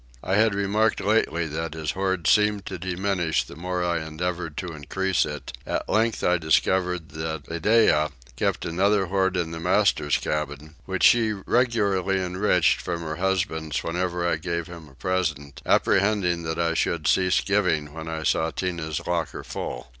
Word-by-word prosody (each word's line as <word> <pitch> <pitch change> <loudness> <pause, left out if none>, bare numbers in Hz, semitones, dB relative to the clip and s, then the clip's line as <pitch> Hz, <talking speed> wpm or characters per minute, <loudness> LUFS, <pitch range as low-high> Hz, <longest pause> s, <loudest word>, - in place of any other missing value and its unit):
I 95 - -2
had 105 0 +3
remarked 105 +2 +1
lately 95 -5 +1
that 80 +1 -4
his 80 -1 -2
hoard 95 -2 -1
seemed 105 +2 +3
to 95 - -6
diminish 90 -2 0
the - - -12
more 90 +2 -2
I 85 -2 0
endeavoured 85 0 -4
to 90 -3 -4
increase 95 +4 0
it: 75 -1 -7
at - - -3
length 110 +1 +1
I 90 0 +3
discovered 90 +2 +1
that 80 -1 -4
Iddeah 85 -3 +3 0.3
kept - - -1
another 95 +4 +2
hoard 95 0 +1
in 85 -2 -1
the 80 - -5
master's 85 -4 +2
cabin, 75 0 -4
which 95 -1 -2
she 115 -2 +5
regularly 100 -4 +1
enriched 90 -1 +2
from 85 -1 -3
her 80 -1 -4
husband's 90 -5 -1
whenever 90 +1 -1
I 80 - 0
made 85 -2 -2
him 85 -3 -11
a 65 - -19
present, 70 -3 -2
apprehending 95 -4 +2
that 80 0 -2
I 85 -1 +1
should 80 -1 0
cease 95 -1 +3
giving 90 -8 0
when 80 0 -7
I 80 -1 -4
saw 80 +1 +1
Tinah's 85 -2 -3
locker 85 -1 -2
full. - - -6
90 Hz, 165 wpm, -25 LUFS, 80-95 Hz, 0.3 s, she